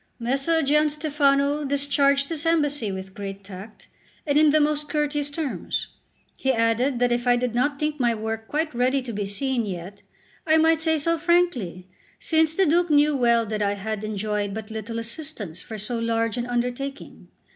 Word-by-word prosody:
Messer 275 +7 0
Gianstefano 295 -1 +2
discharged 280 0 +2
this 330 0 -4
embassy 290 -9 +1
with 190 0 -7
great 195 0 -7
tact, 195 +3 -11 0.4
and 285 -2 0
in 305 0 +6
the 310 +1 +4
most 300 0 0
courteous 295 -1 -1
terms. 290 -2 -3 0.5
He 265 - 0
added 235 +2 +1
that 245 0 +2
if 240 +1 0
I 245 - +5
did 245 -1 -1
not 280 +4 +1
think 300 0 -2
my 240 -2 +2
work 225 +1 -4
quite 310 0 -1
ready 255 +2 +1
to 240 -2 -6
be 205 -1 -3
seen 250 +4 0
yet, 190 0 -7 0.5
I 315 0 +5
might 320 0 +3
say 320 -1 +2
so 335 +2 0
frankly, 315 - +1 0.3
since 320 -1 +1
the 385 - +3
Duke 345 +2 +2
knew 295 0 +4
well 235 -3 +3
that 215 0 -3
I 200 0 +1
had 215 +1 -4
enjoyed 210 -1 -2
but 220 0 -7
little 220 +1 -5
assistance 230 - -4
for 220 - -8
so 220 +3 -3
large 230 -1 0
an 240 -1 -3
undertaking. 250 +3 -4
255 Hz, 180 wpm, -24 LUFS, 220-300 Hz, 0.5 s, in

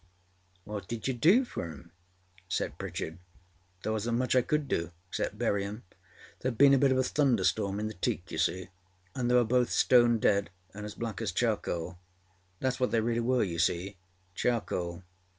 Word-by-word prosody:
â 105 - -11
âWhat 100 -3 -5
did 115 0 -4
you 130 - +1
do 180 - +4
for - - -5
âem?â 85 +1 -11 0.6
said 85 - -2
Pritchard. 80 +2 -5 0.6
âThere 110 - -1
wasnât 115 +2 -1
much 130 +1 +1
I 130 - +6
could 150 +3 -1
do, 85 -9 -1 0.2
except - - -3
bury 100 -1 +1
âem. 105 +4 -6 0.6
Thereâd 125 -3 -1
been 140 +2 +7
a 135 - +5
bit 140 -1 +4
of 130 - +3
a 130 - +3
thunderstorm 100 - +1
in 105 - -2
the 110 - -5
teak, 90 -1 -3
you - - -3
see, 90 0 0 0.4
and 120 -2 -1
they 125 - +4
were 125 - +6
both 125 +1 +2
stone 120 -2 +5
dead 100 -2 +2 0.2
and 105 +1 -6
as 105 - -8
black 115 -1 -4
as 110 -4 -1
charcoal. 90 -5 -1 0.6
Thatâs 130 0 -1
what 125 - +2
they 115 - +2
really 115 +1 0
were, 125 +1 +2
you 85 -4 -3
seeâcharcoal. 90 +1 -2
110 Hz, 185 wpm, -30 LUFS, 95-125 Hz, 0.6 s, been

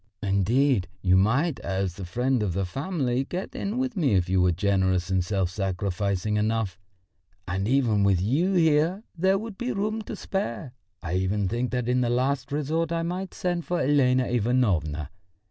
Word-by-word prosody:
Indeed, 100 +3 +2 0.2
you 90 -1 +4
might, 125 - +2
as 95 -2 -2
the 95 0 -7
friend 125 +7 0
of 100 -4 -1
the 95 +1 -1
family, 135 - -1
get 180 +7 -5
in 205 +4 -3
with 260 -2 -1
me 145 - +2
if 90 -1 +2
you 95 0 +3
were 90 0 +4
generous 95 0 +1
and 95 -1 +2
self 95 -2 -1
sacrificing 100 +1 -1
enough 105 -3 -1 0.7
and 95 +2 -1
even 115 -5 +2
with 100 -3 +3
you 145 - +1
here 165 +4 +3
there 190 +3 +2
would 215 -1 -7
be 245 +1 -2
room 215 +2 -1
to - - -6
spare. 125 - -4 0.3
I 85 0 -3
even 95 +2 0
think 120 +5 -1
that 125 -2 -2
in 125 0 +2
the 120 - +1
last 130 +2 0
resort 155 +3 -1
I 165 0 0
might 180 +2 -4
send 175 -1 -1
for 175 -1 -1
Elena 130 -2 +3
Ivanovna. 100 - 0
120 Hz, 180 wpm, -26 LUFS, 95-155 Hz, 0.7 s, you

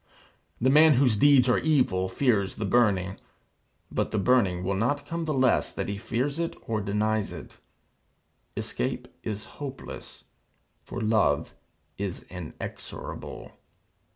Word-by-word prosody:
The 130 +2 +3
man 155 +1 +7
whose 125 -3 +4
deeds 130 +2 +6
are 125 - +4
evil, 125 -12 +2
fears 100 -3 +1
the 110 - -3
burning. 95 -4 +2 0.7
But - - 0
the 110 - -2
burning 100 -5 +3
will 95 +2 0
not 125 +9 0
come 165 0 -3
the 155 - -1
less 130 -1 +3
that - - -4
he 100 0 -3
fears 135 +8 -1
it 170 0 -2
or 110 -2 0
denies 105 +1 0
it. - - -10 1.0
Escape - - -3
is 105 -1 -4 0.2
hopeless. 135 -2 -7 0.6
For 120 - -6
Love 110 -10 +2 0.5
is 100 -3 -4
inexorable. 90 -4 -7
110 Hz, 130 wpm, -27 LUFS, 100-135 Hz, 1.0 s, man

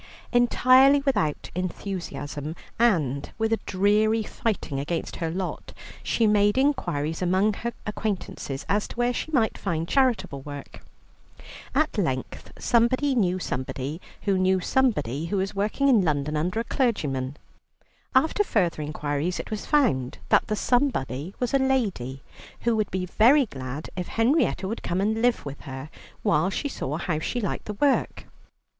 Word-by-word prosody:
Entirely 255 +3 +5
without 155 - 0
enthusiasm, 170 -5 -4 0.2
and 155 - +2
with 225 0 +1
a 225 - +1
dreary 210 +3 +2
fighting 195 -10 -2
against 165 +4 -3
her 165 -2 -2
lot, 185 +3 -4 0.3
she 230 - +1
made 205 0 +3
inquiries 175 - 0
among 190 +4 +2
her 235 +4 -4
acquaintances 200 -10 -4
as 205 +1 +1
to - - -10
where 240 +1 +1
she 310 - -4
might 230 -7 +1
find 165 -4 -2
charitable 200 - +1
work. 145 0 -9 0.9
At 300 -6 +1
length 130 -9 -3
somebody 255 +4 +2
knew 185 -7 +2
somebody, 135 0 -4 0.2
who 195 -2 +2
knew 185 0 +3
somebody 165 - 0
who 200 - -1
was 195 +1 -1
working 210 +8 0
in 245 -7 +5
London 150 -3 0
under 180 +8 0
a - - 0
clergyman. 145 - -1 0.8
After 320 +10 +4
further 180 - 0
inquiries 150 +3 -2
it - - -6
was 215 - -4
found 215 - +2
that - - +4
the 215 - 0
somebody 195 - 0
was 245 0 -1
a 275 - +4
lady, 200 - 0 0.4
who 235 -1 +2
would 215 -2 0
be 185 0 -2
very 250 - +5
glad 135 - -7
if 180 -1 -3
Henrietta 230 -4 +1
would 225 +4 -4
come 175 +1 -1
and 220 +3 +1
live 245 0 +2
with 140 -1 -7
her, 135 +3 -7 0.3
while 200 -3 +3
she 285 +8 -2
saw 150 - -3
how 170 -2 -1
she 245 +9 -2
liked 205 - -3
the 210 - -4
work. 280 +5 +1
195 Hz, 155 wpm, -25 LUFS, 155-235 Hz, 0.9 s, Entirely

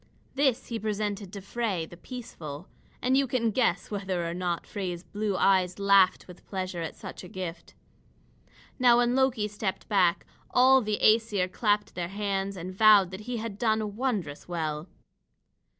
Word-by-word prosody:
This 270 -3 +1
he 230 -1 -3
presented 205 -2 -3
to 200 - -7
Frey 200 -4 -2
the 175 - -13
peaceful. 180 - -8 0.4
And 255 +1 +3
you 275 0 +3
can 235 -2 0
guess 200 -5 0
whether 190 -4 -2
or 170 - -3
not 175 -1 -2
Frey's 180 -4 -5
blue 205 -1 -2
eyes 185 -2 +3
laughed 200 -2 +4
with 180 -1 -13
pleasure 185 -2 -4
at 165 - -5
such - - -9
a - - -8
gift. 180 -2 -7 1.0
Now 245 -2 +6
when 240 0 +3
Loki 260 -5 +2
stepped 210 -2 -4
back, 185 -4 +2 0.2
all 260 +1 +5
the 210 -2 -1
Æsir 215 -4 +3
clapped 210 0 0
their 175 -1 -3
hands 195 0 -2
and 180 +2 -6
vowed 205 -2 +6
that 190 +2 -7
he 245 - -2
had 220 -2 -5
done 220 -3 0
wondrous 210 - -2
well. 160 -2 -3
200 Hz, 165 wpm, -28 LUFS, 180-225 Hz, 1.0 s, Now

